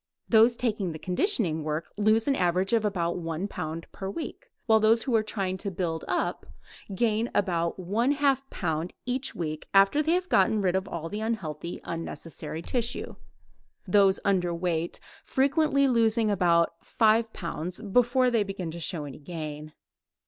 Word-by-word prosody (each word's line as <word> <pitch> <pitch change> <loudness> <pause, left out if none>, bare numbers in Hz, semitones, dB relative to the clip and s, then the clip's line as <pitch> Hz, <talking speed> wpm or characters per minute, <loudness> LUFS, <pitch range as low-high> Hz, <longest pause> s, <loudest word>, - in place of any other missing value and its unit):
Those 230 +1 +5
taking 210 -8 -1
the - - -6
conditioning 180 - +1
work 155 +1 -4
lose 215 +3 +2
an 275 - +3
average 185 +2 +1
of 225 -2 +3
about 180 -4 -1
one 165 +3 -3
pound 160 -3 -5
per 190 -1 -6
week, 335 - -7 0.2
while 220 -1 +5
those 220 +1 +4
who 255 -4 0
are 220 - +4
trying 195 -3 -3
to 200 +2 -4
build 170 -3 -3
up - - -2 0.5
gain 225 +2 +1
about 170 -4 0
one 215 +9 +1
half 275 -2 +1
pound 165 -1 -3
each 255 +2 -1
week 155 -2 -4
after 195 +9 +5
they 315 +2 +1
have 365 +1 0
gotten 205 - +3
rid 185 -2 +1
of 190 0 -1
all 165 -1 -5
the 210 +5 -5
unhealthy 175 -7 -4
unnecessary 165 -1 -6
tissue, 235 +2 -3 0.7
those 195 0 +4
underweight 175 -3 0 0.3
frequently 280 0 +2
losing 225 -3 +3 0.5
five 225 0 +2
pounds 170 -1 -5
before 245 +4 +2
they 230 -2 +2
begin 195 -4 -4
to 170 - -7
show 160 -2 -3
any 140 -1 -9
gain. 155 -1 -7
195 Hz, 155 wpm, -27 LUFS, 170-230 Hz, 0.7 s, Those